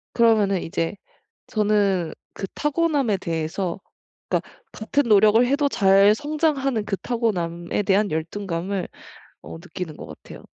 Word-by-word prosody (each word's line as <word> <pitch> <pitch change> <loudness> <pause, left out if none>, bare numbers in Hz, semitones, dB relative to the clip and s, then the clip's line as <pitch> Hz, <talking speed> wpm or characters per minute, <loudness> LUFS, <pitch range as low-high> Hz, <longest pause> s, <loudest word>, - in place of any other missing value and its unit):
그러면은 215 -5 +3
이제 165 +2 -2 0.5
저는 205 -5 +1 0.2
그 195 - -5
타고남에 295 - +1
대해서 170 +2 -3 0.5
그니까 - - -1 0.2
같은 280 +6 0
노력을 215 +1 +5
해도 285 +3 +1
잘 195 -1 +5
성장하는 285 -5 -1
그 200 - -1
타고남에 185 -7 -2
대한 200 +1 +2
열등감을 175 +3 -3 0.6
어 80 +3 -9
느끼는 160 - -7
것 - - -9
같아요. - - -12
205 Hz, 285 characters per minute, -23 LUFS, 175-235 Hz, 0.6 s, 노력을